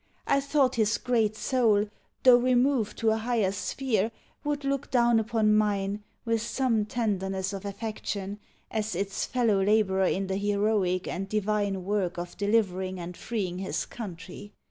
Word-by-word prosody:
I 280 - +3
thought 275 -2 +1
his 215 -1 +2
great 225 -4 +1
soul, 215 -3 +2 0.4
though 250 -1 +8
removed 250 -2 +2
to 225 -1 +2
a 220 - +1
higher 225 -4 +1
sphere, 225 +1 -1 0.3
would 290 -1 -2
look 275 0 -1
down 240 -2 +4
upon 220 -1 +2
mine 205 -1 0 0.2
with 230 -1 +1
some 230 -3 0
tenderness 195 -4 -1
of 195 0 -6
affection, 205 -1 -4 0.3
as 215 -3 -2
its 195 +2 -2
fellow 230 -6 +2
labourer 195 -2 +3
in 195 +1 0
the 190 0 -2
heroic 200 -2 +1
and 195 +2 -4
divine 205 -2 0
work 195 -3 -1
of 175 0 -5
delivering 190 -3 0
and 175 +1 -6
freeing 185 -6 -3
his 190 - -2
country. 190 -1 -8
210 Hz, 150 wpm, -28 LUFS, 195-230 Hz, 0.4 s, though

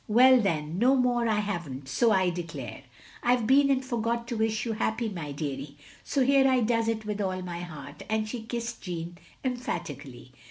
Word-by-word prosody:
" - - -35
Well 260 -1 +8
then, 160 -3 -1
no 255 +4 +5
more 245 -2 +2
I 220 - +3
have 175 -7 -3
n't, 130 +1 -7
so 220 - +3
I 190 -3 +3
declare! 160 -9 -6 0.4
I 245 +1 +4
Ve 240 -3 -2
been 275 +3 +5
and 265 -1 +2
forgot 235 -1 -1
to 240 - -2
wish 220 0 0
you 230 - -1
happy, 220 +1 -1
my 165 -7 -5
deary, 140 -1 -5 0.3
so 275 - +1
here 270 0 +5
I 255 -1 +3
does 230 0 +1
it 220 -1 -1
with 210 0 -2
all 185 -1 -2
my 175 -1 -5
heart, 170 -4 -9
" - - -24
and 215 0 0
she 235 +1 -5
kissed 230 0 -5
Jeanne 175 -1 -5 0.3
emphatically. 145 - -4
215 Hz, 210 wpm, -28 LUFS, 170-240 Hz, 0.4 s, Well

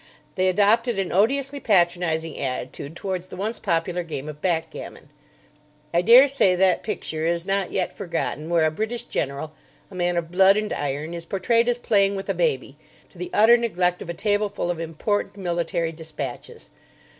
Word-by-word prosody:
They 185 0 +1
adopted 210 +5 +3
an 195 -2 -1
odiously 275 +8 +1
patronising 175 - +1
attitude 135 +3 -4
towards 185 -1 -4
the - - -9
once 215 +4 -3
popular 170 +2 -1
game 150 -4 -6
of 150 -1 -8
backgammon. 165 -3 -3 0.8
I 170 - +4
daresay 245 -2 +6
that 185 0 +3
picture 160 -6 -3
is 170 0 -1
not 195 -1 -1
yet 185 - -2
forgotten 160 -3 -3
where 170 -2 +3
a 155 - +2
British 225 +7 -3
general, 140 - -3 0.4
a - - -12
man 175 -1 0
of 170 -1 -3
blood 190 +2 +5
and 215 0 -1
iron, 145 +3 -3
is 170 -1 -6
portrayed 230 +5 +1
as 245 - +1
playing 200 -4 +2
with 195 0 -6
a - - +2
baby, - - -1 0.3
to - - -18
the 360 - -4
utter 230 -1 +6
neglect 180 -6 0
of - - -8
a 170 - -4
table 205 +2 0
full 185 -3 -2
of 170 - -5
important 195 +5 -2
military 170 -2 -1
dispatches. 155 -6 -8
180 Hz, 175 wpm, -24 LUFS, 165-210 Hz, 0.8 s, daresay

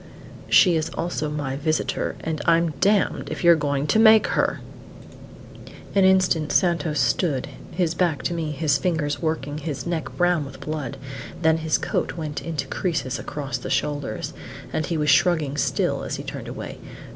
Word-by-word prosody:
"She 180 -3 +6
is 155 - -1
also 165 -3 -2
my 145 -3 -3
visitor, 155 +2 -1
and 160 -1 -3
I'm 165 0 +3
damned 200 0 +2
if - - -5
you're 170 0 +7
going 145 -2 -1
to 220 - +2
make 220 -1 +7
her!" - - +1 1.3
An 195 - +4
instant 185 -5 +3
Santos 165 -4 +1
stood, 130 +3 +1 0.2
his 170 -2 0
back 170 -5 0
to - - -1
me, 165 -2 -2
his 145 -1 +1
fingers 150 -2 -1
working, 155 -2 -2
his 145 -6 -5
neck 170 -2 -2
brown 175 -3 +2
with 135 -1 -10
blood; 150 -5 -4 0.5
then 160 0 +4
his 160 -1 +1
coat - - -2
went 155 -3 -4
into 155 -5 -3
creases 160 -3 -2
across 135 -4 -4
the - - -6
shoulders, 145 -2 -2 0.4
and 155 - -1
he 165 - -1
was 150 -1 +3
shrugging 155 -3 +3
still 145 - 0
as - - -4
he - - -6
turned - - -7
away. - - -7
155 Hz, 170 wpm, -23 LUFS, 145-170 Hz, 1.3 s, you're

